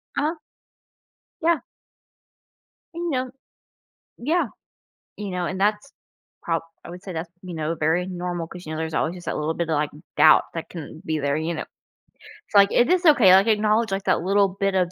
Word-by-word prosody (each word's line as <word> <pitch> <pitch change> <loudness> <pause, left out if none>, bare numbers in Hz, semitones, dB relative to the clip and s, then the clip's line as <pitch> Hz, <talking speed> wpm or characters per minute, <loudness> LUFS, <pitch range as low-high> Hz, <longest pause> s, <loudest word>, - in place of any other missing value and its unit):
Uh-huh. 310 +4 0 1.0
Yeah. 335 0 +3 1.4
You 340 0 -3
know 255 -2 -2 0.9
yeah, 320 +8 +1 0.7
you 210 -1 -5
know, 180 -1 -2
and 190 +2 -4
that's 210 +6 0 0.5
prob 165 -1 0 0.2
I - - -9
would 180 +1 -10
say 190 - -7
that's, 165 +1 -5
you 180 -2 -8
know, 160 +1 -2
very 165 +4 +1
normal 175 -2 -4
'cause, 180 0 -11
you 155 - -6
know, 155 - -4
there's 160 -1 -3
always 160 +3 0
just 175 - -11
that - - -2
little 155 +2 -1
bit 170 -1 -3
of, - - +1
like, 150 0 0 0.3
doubt - - +7
that 165 - -5
can 160 -2 -9
be 160 -1 -1
there, 140 0 0
you 160 +2 -2
know? 155 - -4 0.8
So, 205 - +2
like, 200 0 +5
if 245 - +3
it's 360 0 +2
okay, 245 - +7
like, 195 +3 +6
acknowledge, 215 0 +2
like, 195 0 -2
that - - +2
little 195 +2 +3
bit 195 -1 +1
of 180 -2 +1
185 Hz, 195 wpm, -23 LUFS, 165-215 Hz, 1.4 s, doubt